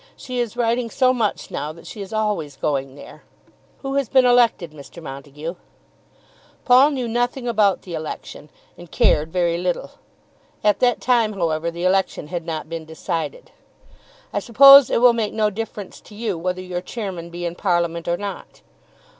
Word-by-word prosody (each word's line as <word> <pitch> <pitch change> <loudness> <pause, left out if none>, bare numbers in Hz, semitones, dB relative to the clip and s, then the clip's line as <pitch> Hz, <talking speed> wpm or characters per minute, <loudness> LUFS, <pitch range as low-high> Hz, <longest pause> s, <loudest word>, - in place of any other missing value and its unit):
"She 255 -1 -5
is 240 -1 -3
writing 235 0 0
so 255 +1 +2
much 225 -5 -2
now 150 - -4
that 170 - -15
she 210 - -8
is 195 +1 -8
always 210 -10 -2
going 135 -2 -2
there. - - -13 0.6
Who 270 0 -3
has 275 -4 0
been 260 -1 +5
elected, 235 -9 +3
Mr. 150 +3 -12
Montague?" 145 +2 -7 1.1
Paul 255 +3 +6
knew 260 -5 -3
nothing 245 +2 -1
about 210 -5 +2
the 180 - -9
election, 155 -1 -7 0.3
and 175 -1 -12
cared 155 +1 +2
very 170 -1 0
little. 180 0 -2 0.7
At 210 -1 +3
that 245 -1 +2
time, 235 -4 +2
however, 165 -3 -1
the 170 +1 -6
election 190 -5 0
had 175 -1 -5
not 160 -2 -4
been 165 0 -6
decided. 165 - -5 0.8
"I - - +1
suppose 275 +2 +8
it - - +1
will 245 -1 +7
make 225 -3 -2
no 215 -1 +1
difference 210 -1 -7
to 210 - -15
you 215 -3 -2
whether 180 +2 -3
your 180 -1 -4
chairman 185 -5 -6
be 175 +1 -6
in 170 - -2
Parliament 170 -2 -1
or 170 0 0
not?" 200 0 -7
190 Hz, 170 wpm, -21 LUFS, 165-235 Hz, 1.1 s, suppose